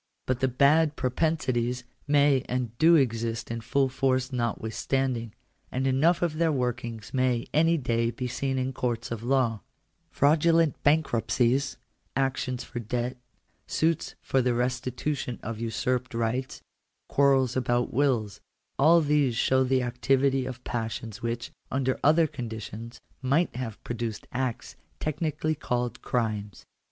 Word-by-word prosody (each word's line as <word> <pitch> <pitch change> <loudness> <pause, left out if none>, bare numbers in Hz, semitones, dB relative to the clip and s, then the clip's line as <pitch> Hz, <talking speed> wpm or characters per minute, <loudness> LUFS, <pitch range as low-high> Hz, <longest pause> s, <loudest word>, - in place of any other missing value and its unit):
But 130 -1 0
the 130 - +2
bad 145 +4 +4
propensities 125 -3 0 0.2
may 145 -2 +4
and 125 -2 -2
do 165 +1 +7
exist 115 -6 0
in 115 0 -3
full 135 +4 +1
force 130 0 0
notwithstanding; 120 +1 -1 0.4
and 130 +1 -1
enough 155 +7 +3
of 160 -2 -1
their 165 -1 +3
workings 120 -4 -3
may 130 -2 +1
any 165 +2 +4
day 115 -4 0
be 125 +2 -4
seen 135 +2 -2
in 130 +1 -1
courts 120 -2 -2
of 115 -2 -3
law 120 -3 +1 0.5
Fraudu 155 +4 +3
lent 165 -3 +2
bankruptcies, 135 -3 +2 0.4
actions 130 -2 -1
for 120 - -6
debt, 120 +2 -2 0.5
suits 165 0 0
for 135 - +2
the 125 -1 +1
restitution 125 +1 -2
of 110 0 -5
usurped 125 +2 -1
rights, 115 +3 -2 0.4
quarrels 135 -3 +3
about 120 -1 0
wills 120 -7 +1 0.2
— - - -50
all 165 +4 +6
these 145 -5 +2
show 130 +3 +3
the 130 0 +2
activity 130 +2 +1
of 130 -1 -7
passions 110 -2 -4
which, 115 0 -3 0.2
under 130 -1 0
other 160 +3 +5
conditions, 115 -3 -7 0.2
might 140 +5 +1
have 120 -4 -5
produced 115 -2 -4
acts 125 -2 -3 0.2
technically 155 0 -1
called 125 -4 -2
crimes. 105 -5 -2
130 Hz, 135 wpm, -27 LUFS, 120-140 Hz, 0.5 s, do